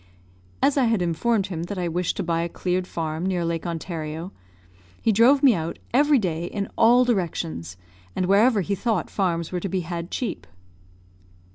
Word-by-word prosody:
As 285 - +3
I 265 - +4
had 225 -3 +2
informed 195 +5 +1
him 165 - -4
that 200 +2 -6
I 180 -1 -1
wished 175 +1 -1
to - - -1
buy 165 -1 0
a 170 - -2
cleared 180 +1 -2
farm 160 -1 -3
near 180 -2 0
Lake 165 +1 -2
Ontario, 165 0 -5 0.7
he 225 - +2
drove 250 +7 +5
me 265 -4 +7
out 165 -3 -3 0.2
every 290 +3 +5
day 170 -6 -1
in 200 +2 -4
all 245 +2 +5
directions, 90 - -2 0.4
and 185 - 0
wherever 205 +3 +4
he 200 +2 -2
thought 210 -2 -1
farms 170 -4 -1
were 180 - -1
to 195 - -4
be 185 +1 -1
had 170 0 -5
cheap. 250 - -4
180 Hz, 180 wpm, -24 LUFS, 170-220 Hz, 0.7 s, me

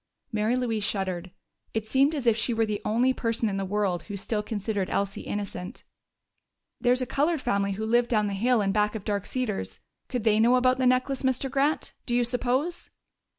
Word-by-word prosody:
Mary 215 +2 +1
Louise 230 -4 -1
shuddered: 190 -3 -2 0.5
it 220 -1 -1
seemed 275 +6 +3
as 275 -4 -3
if 230 -2 +5
she 230 +1 -1
were 225 0 +2
the 210 -1 -3
only 240 +5 +2
person 230 -2 -1
in 195 -2 -2
the 195 - -1
world 190 -3 0
who 200 - -4
still 210 +2 -1
considered 205 -2 -2
Elsie 200 0 -1
innocent. 195 -3 -5 1.0
"There's 250 +1 +2
a - - -2
colored 300 +6 +1
family 200 -5 0
who 215 +3 -3
live 240 +2 +3
down 215 -3 +2
the 200 - -2
hill 235 +3 +2
in 195 - +1
back 210 +1 +1
of 210 - -6
Dark 205 -2 -1
Cedars. 250 -6 -3 0.3
Could 250 -4 -2
they 215 -1 +3
know 235 +3 +5
about 255 0 +3
the 255 - +3
necklace, 255 +1 +1
Mr. 260 0 0
Grant, 280 +3 0
do 240 - 0
you 245 - +3
suppose?" 255 +7 -1
225 Hz, 200 wpm, -27 LUFS, 205-255 Hz, 1.0 s, if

